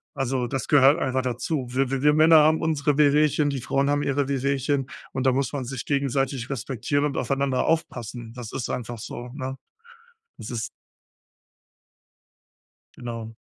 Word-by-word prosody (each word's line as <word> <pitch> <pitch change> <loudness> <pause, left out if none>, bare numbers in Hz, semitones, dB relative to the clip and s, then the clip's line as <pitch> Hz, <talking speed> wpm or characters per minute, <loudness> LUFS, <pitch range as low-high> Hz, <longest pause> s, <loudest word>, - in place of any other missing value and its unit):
Also, 130 -1 -1
das 135 0 -3
gehört 145 +1 +5
einfach 130 0 0
dazu. 130 +3 -2
W 130 +1 0
w 135 - -1
wir 150 +1 +5
Männer 155 +1 +6
haben 155 +1 +4
unsere 150 -2 +1
Wehwehchen, 150 0 +3
die 135 -3 -3
Frauen 140 +2 0
haben 145 0 +1
ihre 140 -1 0
Wehwehchen 140 0 0 0.3
und 130 0 -2
da 130 - +5
muss 135 +1 0
man 135 -3 -3
sich 130 -1 -5
gegenseitig 135 -2 -1
respektieren 135 +2 -2
und 140 - -2
aufeinander 135 -1 0
aufpassen. 120 -7 -2
Das 120 -3 -8
ist 125 - -3
einfach 120 -1 -4
so, 120 +3 -7
ne? 130 -1 -5 0.8
Das 105 - -8
ist 115 -2 -3 2.3
Genau. 115 -2 -6
135 Hz, 155 wpm, -25 LUFS, 125-145 Hz, 2.3 s, Männer